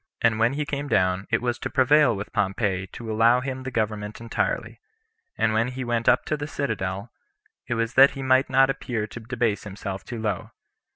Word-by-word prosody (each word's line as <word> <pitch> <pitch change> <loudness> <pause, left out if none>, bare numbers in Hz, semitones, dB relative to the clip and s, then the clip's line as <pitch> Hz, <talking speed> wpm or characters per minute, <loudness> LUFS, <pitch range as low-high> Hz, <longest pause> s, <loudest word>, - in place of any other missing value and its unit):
And 115 -1 +3
when 115 +3 +3
he 150 +1 -2
came 145 0 -3
down, 95 -5 +1
it 115 +1 0
was 120 -1 -1
to - - -4
prevail 145 -1 +4
with 100 +1 -7
Pompey 95 -1 0
to 115 +3 -7
allow 115 +3 +4
him 130 0 -4
the 130 - -5
government 105 -3 -3
entirely; 115 0 -2 0.6
and 110 -1 +2
when 115 +2 +2
he 130 +1 -5
went 120 -1 +1
up - - +3
to 155 - -1
the 145 0 -5
citadel, 110 -7 -3 0.6
it 120 - -1
was 115 0 -1
that 135 +1 +8
he 135 - -4
might 130 +1 +3
not 135 +1 +4
appear 115 -5 -3
to 110 - -9
debase 115 -2 -1
himself 100 -1 -6
too 120 -2 -6
low. 105 -4 -2
115 Hz, 205 wpm, -25 LUFS, 105-130 Hz, 0.6 s, that